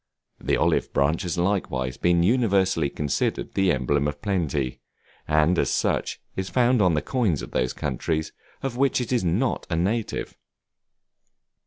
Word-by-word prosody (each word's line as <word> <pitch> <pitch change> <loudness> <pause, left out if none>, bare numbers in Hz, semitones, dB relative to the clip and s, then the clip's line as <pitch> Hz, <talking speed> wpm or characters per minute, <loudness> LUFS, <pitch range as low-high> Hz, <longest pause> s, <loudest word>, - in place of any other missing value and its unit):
The - - 0
olive - - +1
branch 70 +4 +2
has 90 0 -3
likewise 85 -9 -1
been 85 +2 +2
universally 95 - +2
considered 75 0 -2
the 95 -2 +3
emblem 75 -2 +1
of 75 0 -4
plenty, 75 -9 -1 0.5
and 75 +3 +3
as - - +1
such, - - 0 0.2
is 95 0 -3
found 125 -2 +3
on 90 -5 +3
the 75 - -1
coins 110 - 0
of - - -8
those 65 0 0
countries 80 +4 -2 0.3
of 135 -3 -2
which 135 0 +2
it 125 -1 -4
is 120 - +1
not 95 +10 0
a 85 - 0
native. 100 +7 -1
85 Hz, 155 wpm, -25 LUFS, 75-105 Hz, 0.5 s, the